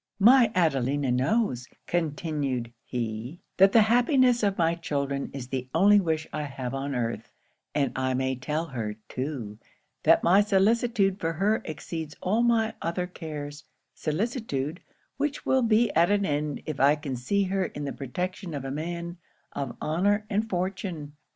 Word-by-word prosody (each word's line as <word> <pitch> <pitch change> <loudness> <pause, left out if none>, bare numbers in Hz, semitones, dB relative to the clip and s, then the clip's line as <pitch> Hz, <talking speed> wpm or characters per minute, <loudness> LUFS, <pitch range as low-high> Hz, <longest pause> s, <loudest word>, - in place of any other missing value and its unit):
'"My 235 +2 +7
Adelina 140 -5 +1
knows," 130 - +1 0.2
continued 145 -7 -2
he, 120 +5 -4 0.2
"that 195 +1 +7
the 225 0 +6
happiness 245 +2 +4
of 200 -2 +1
my 165 -2 +3
children 140 -4 -2
is 130 -2 -7
the 130 -1 -3
only 205 +4 +6
wish 160 -4 -1
I 150 - -2
have 135 -3 -5
on 135 0 -3
earth; 120 -1 -3 0.4
and 140 -2 +1
I 130 0 0
may 130 0 0
tell 150 +6 -2
her, 115 -8 -4
too, 125 -6 -5 0.4
that - - +5
my 190 +4 +6
solicitude 205 0 +2
for 165 -3 -1
her 210 +7 +1
exceeds 155 -1 -6
all 210 +5 +1
my 225 -2 +2
other 170 +2 -1
cares 150 -4 -7 0.3
solicitude, 165 - -2 0.4
which 290 +1 -2
will 265 0 +3
be 230 -1 +3
at 170 +2 +4
an 205 -1 +2
end 145 -1 -2
if 155 -3 -4
I 140 +2 +5
can 145 -3 -5
see 200 +12 0
her 190 0 0
in 145 -3 -5
the 140 - -3
protection 180 - -4
of 135 -1 -5
a 135 - -3
man 170 +4 -4 0.4
of 135 -3 -4
honour 200 +7 +1
and 215 +2 0
fortune. 180 -5 -3
160 Hz, 160 wpm, -27 LUFS, 140-200 Hz, 0.4 s, My